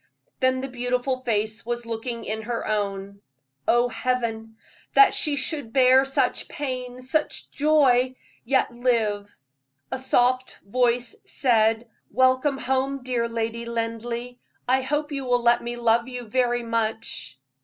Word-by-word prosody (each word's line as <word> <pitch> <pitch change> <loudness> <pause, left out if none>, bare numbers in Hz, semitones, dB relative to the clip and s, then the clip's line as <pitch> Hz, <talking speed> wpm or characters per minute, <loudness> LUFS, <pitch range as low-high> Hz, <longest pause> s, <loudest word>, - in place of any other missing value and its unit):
Then 260 0 +2
the 270 - -4
beautiful 250 +1 -1
face 220 -2 -1
was 240 0 -4
looking 230 +1 -4
in 220 +1 -3
her 230 +1 -3
own. 200 -1 -3 0.5
Oh, 240 +1 +4
Heaven! 230 -3 -2 0.4
that 415 - +7
she 300 -3 +2
should 280 -4 -2
bear 260 0 +6
such 270 - 0
pain, 255 -3 -5
such 300 +4 -1
joy, 265 -4 +3 0.3
yet 265 +1 +1
live. 220 -4 -1 0.5
A 260 - -2
soft 255 0 +1
voice 240 +2 +1
said: 225 -2 +2 0.2
"Welcome 260 +2 +2
home, 265 +1 -1
dear 240 -2 -1
Lady 230 0 -3
Linleigh. 235 +1 -4 0.3
I 260 +1 +3
hope 295 +3 -2
you 275 -2 -3
will 245 -1 +1
let 235 0 +4
me 240 0 -4
love 235 0 +2
you 250 -1 -6
very 240 +1 +1
much." 225 - -2
245 Hz, 135 wpm, -24 LUFS, 230-260 Hz, 0.5 s, that